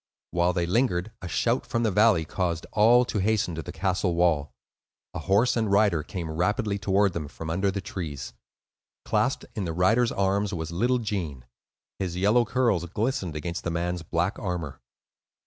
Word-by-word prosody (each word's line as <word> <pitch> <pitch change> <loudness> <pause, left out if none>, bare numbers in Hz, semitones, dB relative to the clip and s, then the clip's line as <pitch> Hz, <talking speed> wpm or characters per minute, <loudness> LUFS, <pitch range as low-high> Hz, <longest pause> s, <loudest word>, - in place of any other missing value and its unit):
While 85 +1 +2
they 85 -1 0
lingered, 95 0 +1
a 95 - -5
shout 115 +10 +1
from 115 -1 -1
the 110 - +2
valley 105 -4 +4
caused 85 -1 -2
all 120 +4 +5
to 110 - -2
hasten 105 -2 +1
to 80 - -4
the - - -7
castle 90 0 0
wall. 85 -4 +2 0.6
A - - -4
horse 100 +6 +2
and 110 -4 0
rider 100 -5 +3
came 85 +1 -5
rapidly 100 +5 0
toward 100 -1 +2
them 75 -4 -4
from 80 +2 -6
under 95 +4 +1
the 100 +1 -3
trees; 75 -11 -6 0.7
clasped 130 - 0
in 105 -5 -3
the 80 - -3
rider's 110 +8 +3
arms 100 +1 0
was 80 -1 -4
little 120 +9 +1
Gene; 90 - -4 0.5
his 90 -2 -3
yellow 105 +6 +3
curls 115 -7 +1
glistened 105 - -2
against 85 +3 -4
the - - -2
man's 85 +1 -2
black 85 +4 -1
armor. 85 - -4
95 Hz, 175 wpm, -26 LUFS, 85-105 Hz, 0.7 s, all